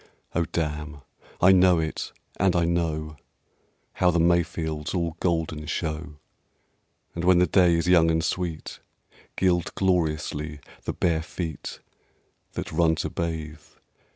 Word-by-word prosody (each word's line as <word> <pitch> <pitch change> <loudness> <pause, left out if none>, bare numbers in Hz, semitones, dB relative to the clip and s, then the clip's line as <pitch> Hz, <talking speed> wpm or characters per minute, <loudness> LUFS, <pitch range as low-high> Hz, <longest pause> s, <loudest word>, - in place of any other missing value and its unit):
Oh, 85 0 +1
damn! 75 -2 -3 0.4
I 95 - +7
know 90 -1 +6
it! 80 -1 -3 0.3
and 95 -1 +3
I 85 -1 +3
know 80 -3 -1 0.8
How 90 - +3
the 85 -1 +2
May 85 +1 +4
fields 80 -1 -4
all 85 -3 -1
golden 80 -3 -1
show, 80 -1 -3 1.0
And 85 - -4
when 90 0 +5
the 90 - +5
day 90 0 +4
is 85 +1 0
young 85 -2 +5
and 80 0 +1
sweet, 85 -4 -3 0.6
Gild 90 -2 +1
gloriously 75 -4 0 0.3
the - - -2
bare 80 -2 +1
feet 80 -1 -6 0.7
That - - -5
run 80 0 +3
to 80 - -3
bathe... 80 -2 -4
85 Hz, 135 wpm, -26 LUFS, 80-90 Hz, 1.0 s, I